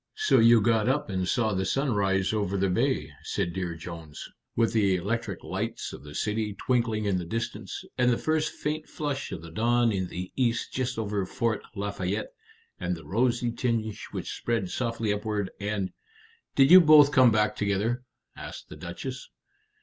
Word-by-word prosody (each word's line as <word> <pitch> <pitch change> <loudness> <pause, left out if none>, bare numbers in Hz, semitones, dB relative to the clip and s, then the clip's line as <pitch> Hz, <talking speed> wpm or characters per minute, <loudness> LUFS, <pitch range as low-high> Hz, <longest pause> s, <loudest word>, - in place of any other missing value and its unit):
"So 430 0 +3
you 115 0 +7
got 110 +1 +2
up 140 -4 0
and 95 -1 -1
saw 110 -1 +1
the 95 0 0
sun 135 +5 0
rise 95 -1 +1
over 100 -2 0
the 95 0 +1
bay," 90 - 0
said 85 - -2
Dear 90 -3 -3
Jones, 80 -2 -8 0.3
"with 115 0 +2
the 100 -4 +3
electric 105 +6 -3
lights - - -4
of - - -9
the 75 0 -10
city 105 -1 -1
twinkling 115 -4 0
in 95 -3 +1
the - - -4
distance, 115 +7 -4
and 125 -1 +4
the 120 - +2
first 155 -1 0
faint 155 +1 -4
flush 145 -2 -3
of 85 -4 -6
the 85 - -10
dawn 120 +5 +2
in 95 -3 -1
the 90 +1 -6
east 120 -2 0
just 125 -1 -2
over 105 -3 -1
Fort 115 0 -1
Lafayette, 100 - -3 0.5
and 90 0 -1
the 80 -3 -12
rosy 120 +6 +1
tinge 115 -3 -2
which - - -5
spread 115 -6 -1
softly 115 -3 -1
upward, 105 -2 -2
and 100 -2 -2 0.3
" 455 +1 -31
"Did 135 +2 +5
you 185 0 +11
both 150 -3 +7
come 130 -3 +6
back 105 -1 +2
together?" 105 +5 0 0.3
asked - - -9
the - - -9
Duchess. - - -7
110 Hz, 180 wpm, -27 LUFS, 95-125 Hz, 0.5 s, you